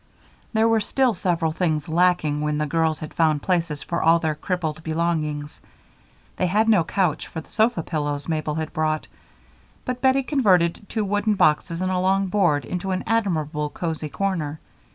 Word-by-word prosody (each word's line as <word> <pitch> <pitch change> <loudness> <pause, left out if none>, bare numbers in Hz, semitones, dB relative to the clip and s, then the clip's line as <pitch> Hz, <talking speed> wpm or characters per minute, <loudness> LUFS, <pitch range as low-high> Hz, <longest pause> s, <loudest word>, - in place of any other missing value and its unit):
There 220 0 +3
were 225 -1 +3
still 255 +3 +1
several 170 -3 0
things 155 -3 -1
lacking 160 -3 +2
when 150 0 0
the 150 - 0
children 160 +1 +1
had 155 0 -8
found 155 -3 +2
places 165 -5 -1
for 170 - -2
all 165 +1 +5
their 160 -2 -1
crippled 160 -1 -3
belongings. 155 -2 -2 0.8
They 185 - +1
had 210 +5 +2
no 210 -6 +5
couch 175 -1 -1
for - - -6
the 160 - -13
sofa 220 -6 +2
pillows 145 -3 -3
Mabel 155 -2 -1
had 160 -1 -4
brought, 155 0 -1 0.8
but 250 0 -3
Bettie 265 +1 +3
converted 200 - +2
two 220 -2 -1
wooden 205 +2 +1
boxes 165 0 +2
and 185 0 0
a 185 - 0
long 190 +1 +2
board 175 -7 +2
into 180 +1 -4
an 185 0 -1
admirable 160 -9 0
cozy 160 -2 -4
corner. 155 -3 -2
170 Hz, 175 wpm, -23 LUFS, 155-195 Hz, 0.8 s, all